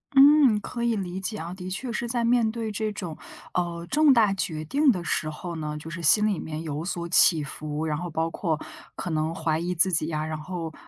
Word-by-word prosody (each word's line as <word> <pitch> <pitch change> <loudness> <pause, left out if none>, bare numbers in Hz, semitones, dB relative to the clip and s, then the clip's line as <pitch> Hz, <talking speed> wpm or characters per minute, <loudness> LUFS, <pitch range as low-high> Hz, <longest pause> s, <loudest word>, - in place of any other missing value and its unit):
嗯， 275 -5 +7
可 235 +3 -5
以 235 -1 +2
理 185 -1 -4
解 215 +3 -3
啊， 170 +2 -6
的 185 -1 -7
确 235 +6 -4
是 235 0 -2
在 240 0 -1
面 235 -2 +3
对 225 -1 -4
这 215 +1 -2
种， 180 -6 -6 0.4
呃， 170 -1 -2
重 300 -2 +5
大 215 -5 +4
决 155 -5 -3
定 280 - +3
的 180 -5 -3
时 155 - -1
候 170 +2 -6
呢， 150 -1 -4
就 160 +2 -8
是 170 0 -6
心 210 +7 +5
里 200 -5 0
面 160 +1 -5
有 155 0 -4
所 170 -1 -3
起 165 -2 +5
伏， 150 +2 -5
然 150 -1 -1
后 175 +2 -5
包 160 +1 -1
括 160 -3 -2 0.4
可 180 - -5
能 155 +1 -1
怀 160 -1 0
疑 175 +2 -2
自 185 +2 +3
己 155 -1 +1
呀， 155 -1 -2
然 155 0 -4
后 165 0 -5
175 Hz, 250 characters per minute, -26 LUFS, 160-215 Hz, 0.4 s, 嗯